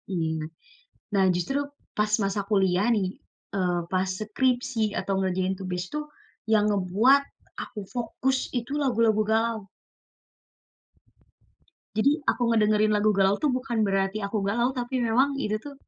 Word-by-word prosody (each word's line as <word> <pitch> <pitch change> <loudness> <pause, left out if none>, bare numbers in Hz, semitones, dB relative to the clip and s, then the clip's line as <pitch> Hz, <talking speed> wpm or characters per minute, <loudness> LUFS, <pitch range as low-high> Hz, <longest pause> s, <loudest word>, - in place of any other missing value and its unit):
iya. 160 -2 -1 0.7
Nah, 195 -1 +4
justru 180 +11 -1 0.4
pas 210 0 +1
masa 195 +1 0
kuliah 190 -1 +2
nih, 190 -3 0 0.5
eee, 180 -2 +1
pas 185 0 +1
skripsi 240 +1 0 0.2
atau 195 - -2
ngerjain 185 0 0
tugas 180 -1 -3
tuh, 300 0 -3 0.5
yang 210 -1 +5
ngebuat 205 +8 +4 0.4
aku 215 - -8
fokus 255 +2 -1 0.2
itu 240 +3 -6
lagu-lagu 230 -4 +3
galau. 225 -2 0 2.3
Jadi 265 +6 +4 0.2
aku - - -3
ngedengerin 215 -1 +3
lagu 215 +1 +3
galau 195 0 +4
tuh 300 - +3
bukan 250 -2 -3
berarti 195 +1 0
aku 200 - -3
galau 235 +4 +2
tapi 245 +1 -4
memang 255 +5 +4 0.2
itu 215 0 0
tuh, 285 -1 -8
215 Hz, 130 wpm, -26 LUFS, 190-240 Hz, 2.3 s, yang